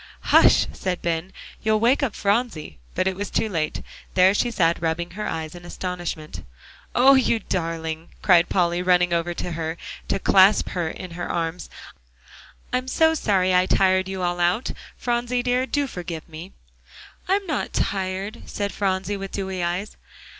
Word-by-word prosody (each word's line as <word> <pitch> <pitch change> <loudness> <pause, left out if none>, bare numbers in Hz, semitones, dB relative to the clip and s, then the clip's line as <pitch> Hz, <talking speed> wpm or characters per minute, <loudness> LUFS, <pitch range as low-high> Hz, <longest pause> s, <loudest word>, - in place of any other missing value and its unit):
"Hush!" - - +7
said 185 -2 -3
Ben, 170 +2 -2 0.3
"you'll 215 -1 +2
wake 245 +6 +3
up 265 -7 -1
Phronsie," 200 - -1 0.2
but - - +1
it 190 0 0
was 200 +1 -4
too 225 - 0
late; 165 -6 -2 0.3
there 185 +1 +6
she 240 +4 +1
sat 170 -7 +1
rubbing 170 +1 -1
her 210 +4 -4
eyes 160 -1 -4
in 175 0 -11
astonishment. 175 -3 -5 0.5
"Oh! 265 +3 +7
you 260 -3 +3
darling," 165 -4 -3
cried 175 -3 +5
Polly, 175 -1 +1
running 180 -1 +3
over 170 +1 -1
to 180 - -4
her, 165 0 -3 0.3
to - - 0
clasp 195 +1 +5
her 175 -3 -2
in 180 +2 -8
her 175 +1 -5
arms, 165 0 -3 1.0
"I'm 255 +1 0
so 320 +4 +3
sorry 190 -10 +1
I 180 0 +4
tired 185 -1 +3
you 190 -1 -4
all 175 0 -1
out, 175 +7 +1 0.3
Phronsie 245 0 -1
dear, 250 +1 +1
do 290 0 0
forgive 175 - -6
me." 165 +3 -10 0.7
"I'm 395 +2 +1
not 310 -5 -2
tired," 195 +3 -2
said 200 -1 -3
Phronsie, 195 0 -1
with 195 0 -6
dewy 190 -2 -3
eyes. 175 +5 -3
185 Hz, 165 wpm, -23 LUFS, 170-210 Hz, 1.0 s, Hush